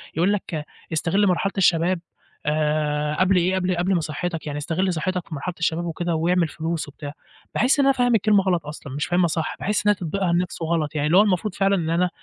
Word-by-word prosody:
يقول 175 +6 +2
لك: 165 -6 -4 0.3
استغلّ 185 +6 +2
مرحلة 190 +2 +1
الشباب، 180 -1 +3 0.5
آآ 150 0 0
قبل 185 +1 +3
إيه، 180 +1 +2
قبل 185 -1 0
قبل 180 +3 +1
ما 175 - +2
صحتك 165 +2 -4
يعني 145 -1 -3
استغل 175 +5 -1
صحتك 180 +2 -2
في 160 - -6
مرحلة 175 +6 -4
الشباب 165 +1 0
وكده، 170 0 -2
واعمل 170 +1 +2
فلوس 160 0 -3
وبتاع، 145 0 -8 0.4
باحس 260 +6 +2
إن 280 - +4
أنا 275 - +5
فاهم 245 -2 +2
الكلمة 210 -2 +3
غلط 175 -5 0
أصلًا، 150 -2 -8
مش 145 +2 -2
فاهمها 175 0 +2
صح، 160 0 -2
باحس 210 +1 -1
إن - - +5
هي 210 - +4
تطبيقها 180 0 -1
نفسه 175 -1 -1
غلط 160 -2 -1
يعني، 150 0 0
اللي 170 +4 +4
هو - - +9
المفروض 200 -1 0
فعلًا 195 0 +2
إن 165 -4 -1
أنا 175 +2 +2
175 Hz, 220 wpm, -23 LUFS, 155-190 Hz, 0.5 s, هو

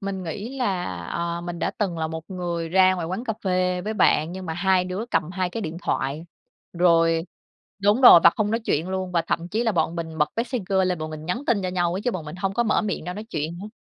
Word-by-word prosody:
mình 195 -2 -4
nghĩ 215 +10 -6
là, 195 -8 0 0.2
ờ, 170 - -3
mình 175 0 -6
đã - - 0
từng 185 -6 -1
là 160 - 0
một 160 0 -6
người 175 -3 -3
ra 185 +2 +5
ngoài 175 -3 -3
quán 185 +8 -4
cà 225 - -1
phê 180 -1 +1
với 215 +4 -4
bạn 160 -5 +3
nhưng 185 -1 -7
mà 160 - -3
hai 185 0 +2
đứa 185 +5 -4
cầm 155 - 0
hai 185 -1 -2
cái 225 - -4
điện 165 -5 -5
thoại, 145 +5 -2 0.5
rồi 165 -2 +3 0.6
đúng 205 +5 +4
rồi, 245 -9 +10
và 170 - +10
không 210 -1 0
nói 225 +1 0
chuyện 170 -6 -1
luôn 185 -1 -3
và 170 -2 +2
thậm 165 +1 -2
chí 220 +5 -1
là 225 - +2
bọn 165 -1 0
mình 160 -1 -5
bật 150 - +3
Messenger 230 -5 -1
lên 180 -2 -1
bọn 155 0 -5
mình 155 0 -8
nhắn 210 +10 -2
tin 215 -5 +2
cho 185 - -1
nhau 175 -1 0
ấy, - - -3
chứ 245 - +1
bọn 185 -8 -5
mình 150 +4 -8
hông 195 +1 -2
có 240 - +2
mở 220 - +1
miệng 205 -6 -3
ra 180 +2 -4
nói 210 +2 -6
chuyện 170 -6 -4
nữa, 200 - -7
180 Hz, 265 wpm, -24 LUFS, 165-200 Hz, 0.6 s, rồi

